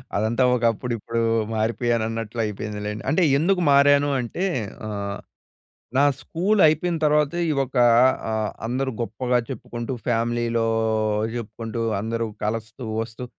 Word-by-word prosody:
అదంతా 110 Hz, +5 st, +1 dB
ఒక 120 Hz, -, -3 dB
అప్పుడు 120 Hz, +2 st, -4 dB
ఇప్పుడు 115 Hz, +2 st, -3 dB, 0.3 s
మారిపోయాను 115 Hz, +1 st, 0 dB
అన్నట్లు 115 Hz, 0 st, -5 dB
అయిపోయిందిలేండి. 105 Hz, 0 st, -5 dB
అంటే 180 Hz, -, +2 dB, 0.2 s
ఎందుకు 180 Hz, +4 st, +2 dB
మారాను 145 Hz, +1 st, +5 dB
అంటే 125 Hz, -, -3 dB, 0.4 s
ఆహ్, 100 Hz, -1 st, -4 dB, 0.8 s
నా 140 Hz, -, +5 dB, 0.2 s
స్కూల్ 190 Hz, -, 0 dB
అయిపోయిన 165 Hz, +3 st, +1 dB
తర్వాతే 150 Hz, +2 st, +2 dB
ఈ -, -, +2 dB
ఒక 130 Hz, +1 st, -11 dB, 0.6 s
ఆహ్, 110 Hz, -1 st, -1 dB, 0.2 s
అందరూ 130 Hz, +3 st, -1 dB
గొప్పగా 125 Hz, +3 st, 0 dB
చెప్పుకుంటూ 120 Hz, 0 st, -5 dB
ఫ్యామిలీలో 115 Hz, 0 st, 0 dB, 0.7 s
చెప్పుకుంటూ 115 Hz, 0 st, -5 dB, 0.2 s
అందరూ 115 Hz, +2 st, -2 dB, 0.2 s
కలస్తూ 115 Hz, +3 st, -4 dB, 0.2 s
వస్తూ 115 Hz, +2 st, -7 dB
120 Hz, 120 wpm, -23 LUFS, 110-140 Hz, 0.8 s, మారాను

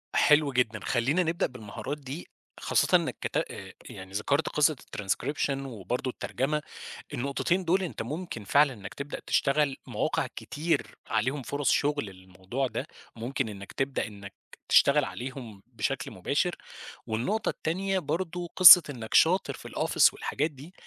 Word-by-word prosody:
حلو 150 Hz, -1 st, +4 dB
جدًا، 120 Hz, -4 st, 0 dB
خلّينا 135 Hz, +10 st, +1 dB
نبدأ 165 Hz, 0 st, 0 dB
بالمهارات 125 Hz, +4 st, -7 dB
دي، 140 Hz, +4 st, -8 dB, 0.3 s
خاصةً -, -, +2 dB
إنّك -, -, -4 dB
كت -, -, -2 dB
آآ -, -, -4 dB, 0.2 s
يعني 95 Hz, 0 st, -10 dB
ذكرت 140 Hz, +10 st, 0 dB
قصّة 150 Hz, +1 st, +3 dB
الtranscription 105 Hz, +9 st, -2 dB, 0.2 s
وبرضو 125 Hz, +2 st, -4 dB
الترجمة، 135 Hz, +4 st, -2 dB, 0.5 s
النقطتين 140 Hz, +8 st, -1 dB
دُول 185 Hz, +3 st, +2 dB
أنت 175 Hz, -, -5 dB
ممكن 145 Hz, -, -5 dB
فعلًا 140 Hz, +6 st, +4 dB
إنّك 100 Hz, -4 st, -9 dB
تبدأ 140 Hz, +1 st, -6 dB
تشتغل 140 Hz, -1 st, +2 dB
مواقع -, -, -1 dB
كتير 160 Hz, +3 st, -2 dB
عليهم 135 Hz, +4 st, 0 dB
فرص 145 Hz, +1 st, 0 dB
شغل 145 Hz, -4 st, +1 dB
للموضوع 95 Hz, +7 st, -5 dB
ده، -, -, -5 dB, 0.3 s
ممكن 125 Hz, +1 st, -3 dB
إنّك 100 Hz, -1 st, -9 dB
تبدأ 135 Hz, 0 st, -1 dB
إنّك 100 Hz, -2 st, -11 dB, 0.3 s
تشتغل 140 Hz, 0 st, +5 dB
عليهم 120 Hz, -6 st, -7 dB
بشكل -, -, -3 dB
مباشر. -, -, -1 dB, 0.5 s
والنقطة 185 Hz, -, -1 dB
التانية 190 Hz, +4 st, -1 dB
برضو 175 Hz, +1 st, -3 dB
قصّة 180 Hz, -1 st, +11 dB
إنّك 115 Hz, -5 st, -7 dB
شاطر -, -, +4 dB
في -, -, -10 dB
الoffice -, -, +3 dB
والحاجات 150 Hz, +3 st, -2 dB
دي، 145 Hz, +5 st, -13 dB
140 Hz, 140 wpm, -28 LUFS, 115-155 Hz, 0.5 s, قصّة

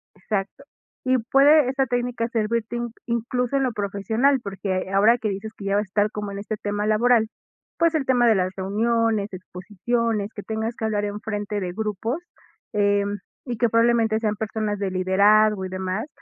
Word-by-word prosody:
exacto. 195 Hz, +5 st, -4 dB, 0.4 s
Y 260 Hz, 0 st, +4 dB
puede 280 Hz, 0 st, +6 dB
esta 270 Hz, 0 st, +1 dB
técnica 245 Hz, -1 st, -1 dB
servirte 230 Hz, +1 st, -1 dB
in-incluso 240 Hz, +2 st, -2 dB
en -, -, +1 dB
lo 255 Hz, -, +1 dB
profesional 220 Hz, +7 st, +1 dB
porque 190 Hz, -1 st, -3 dB
ahora 215 Hz, +5 st, +5 dB
que 215 Hz, -, -1 dB
dices 200 Hz, +3 st, -5 dB
que 200 Hz, -, -8 dB
ya 195 Hz, 0 st, +1 dB
va 205 Hz, -, +3 dB
estar 205 Hz, +1 st, 0 dB
como 205 Hz, -1 st, -5 dB
en 200 Hz, -, -6 dB
este 210 Hz, +1 st, -4 dB
tema 205 Hz, +1 st, -2 dB
laboral. 220 Hz, +1 st, +3 dB, 0.5 s
Pues 335 Hz, 0 st, +3 dB
el 280 Hz, -4 st, 0 dB
tema 245 Hz, -2 st, +4 dB
de 225 Hz, -, +6 dB
las 185 Hz, 0 st, 0 dB
reuniones, 215 Hz, +1 st, 0 dB
exposiciones, 205 Hz, +4 st, -2 dB
que 205 Hz, -, -5 dB
tengas 220 Hz, +1 st, -3 dB
que 220 Hz, -, -4 dB
hablar 210 Hz, -1 st, 0 dB
en 205 Hz, 0 st, -4 dB
frente 205 Hz, -1 st, -3 dB
de 180 Hz, -2 st, -4 dB
grupos, 220 Hz, -, -3 dB, 0.5 s
em, 205 Hz, 0 st, +1 dB, 0.3 s
y 240 Hz, -3 st, -4 dB
que 235 Hz, 0 st, +2 dB
probablemente 230 Hz, -1 st, +3 dB
sean 215 Hz, -2 st, -1 dB
personas 215 Hz, -1 st, -3 dB
de 195 Hz, -2 st, -1 dB
liderazgo 200 Hz, +2 st, +3 dB
y -, -, -5 dB
demás, 190 Hz, +6 st, -3 dB
215 Hz, 180 wpm, -23 LUFS, 200-235 Hz, 0.5 s, puede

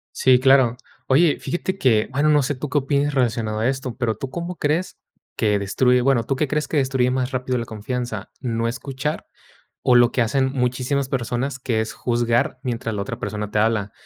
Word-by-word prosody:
Sí, 130 Hz, -1 st, +4 dB
claro. 130 Hz, -2 st, +4 dB, 0.3 s
Oye, 150 Hz, +3 st, +4 dB
fíjate 190 Hz, +2 st, -3 dB
que, 115 Hz, -, +3 dB
bueno, 145 Hz, +3 st, +2 dB
no 150 Hz, -2 st, +4 dB
sé 140 Hz, -, -1 dB
tú 140 Hz, +1 st, -5 dB
qué 145 Hz, -, 0 dB
opines 145 Hz, +1 st, 0 dB
relacionado 115 Hz, -4 st, 0 dB
a 115 Hz, -, +2 dB
esto, 130 Hz, -2 st, -3 dB
pero 115 Hz, -4 st, 0 dB
¿tú 130 Hz, +5 st, -6 dB
cómo 170 Hz, +3 st, -5 dB
crees 155 Hz, +6 st, -1 dB, 0.4 s
que 105 Hz, -2 st, +2 dB
destruye?, 125 Hz, +6 st, +2 dB
bueno, 125 Hz, -2 st, +2 dB
¿tú 135 Hz, -, -1 dB
qué 145 Hz, +2 st, 0 dB
crees 150 Hz, +2 st, -1 dB
que 155 Hz, -, -1 dB
destruye 130 Hz, -2 st, +2 dB
más 130 Hz, 0 st, -1 dB
rápido 130 Hz, -1 st, -1 dB
la 115 Hz, -, -3 dB
confianza? 110 Hz, -1 st, -5 dB
¿No 115 Hz, -2 st, -1 dB
escuchar, 135 Hz, +4 st, -4 dB, 0.6 s
o 125 Hz, -, +4 dB
lo 120 Hz, 0 st, +6 dB
que 125 Hz, -, 0 dB
hacen 130 Hz, +3 st, +1 dB
muchísimas 130 Hz, +1 st, -1 dB
personas, 130 Hz, +1 st, -2 dB
que 115 Hz, -4 st, 0 dB
es 110 Hz, -, -4 dB
juzgar 120 Hz, +1 st, 0 dB
mientras 115 Hz, -3 st, -3 dB
la 100 Hz, -, -2 dB
otra 100 Hz, -, -5 dB
persona 105 Hz, 0 st, -4 dB
te -, -, -1 dB
habla?, 110 Hz, -2 st, +1 dB
125 Hz, 200 wpm, -22 LUFS, 115-135 Hz, 0.6 s, lo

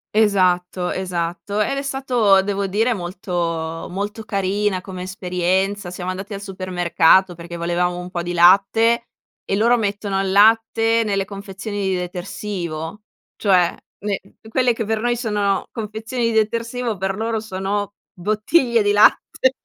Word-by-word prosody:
Esatto, 185 Hz, -4 st, +2 dB
esatto. 180 Hz, +2 st, -2 dB
Ed 275 Hz, +6 st, 0 dB
è 275 Hz, -, -1 dB
stato 250 Hz, -8 st, +2 dB
devo 200 Hz, 0 st, -2 dB
dire 225 Hz, +5 st, +1 dB
molto 175 Hz, -3 st, -3 dB
molto 205 Hz, +4 st, -4 dB
carina 200 Hz, -1 st, 0 dB
come 185 Hz, -2 st, -7 dB
esperienza, 185 Hz, +1 st, -1 dB
siamo 180 Hz, +1 st, -5 dB
andati 195 Hz, +3 st, -5 dB
al 200 Hz, -, -6 dB
supermercato, 185 Hz, -1 st, +2 dB
perché 170 Hz, 0 st, -9 dB
volevamo 175 Hz, +1 st, -1 dB
un 180 Hz, 0 st, -6 dB
po' 175 Hz, -, -2 dB
di 175 Hz, +1 st, -4 dB
latte 200 Hz, +7 st, +4 dB, 0.4 s
e 195 Hz, -, -1 dB
loro 235 Hz, +4 st, +4 dB
mettono 200 Hz, -2 st, -1 dB
il 195 Hz, -1 st, -1 dB
latte 225 Hz, +2 st, +4 dB
nelle 195 Hz, -2 st, 0 dB
confezioni 200 Hz, +1 st, -7 dB
di 185 Hz, -, +1 dB
detersivo, 180 Hz, 0 st, -5 dB, 0.3 s
cioè 185 Hz, -4 st, +3 dB, 0.3 s
ne 200 Hz, -1 st, -2 dB, 0.3 s
quelle 250 Hz, 0 st, +2 dB
che 225 Hz, -, -3 dB
per 220 Hz, +1 st, -1 dB
noi 240 Hz, +1 st, +1 dB
sono 210 Hz, -4 st, -1 dB
confezioni 220 Hz, +2 st, -4 dB
di 230 Hz, -, +1 dB
detersivo, 230 Hz, +1 st, -1 dB
per 190 Hz, +1 st, -2 dB
loro 225 Hz, +1 st, -1 dB
sono 205 Hz, 0 st, -3 dB, 0.2 s
bottiglie 215 Hz, -, +2 dB
di 205 Hz, -, +2 dB
latte. 250 Hz, +5 st, +3 dB
200 Hz, 145 wpm, -21 LUFS, 180-220 Hz, 0.4 s, latte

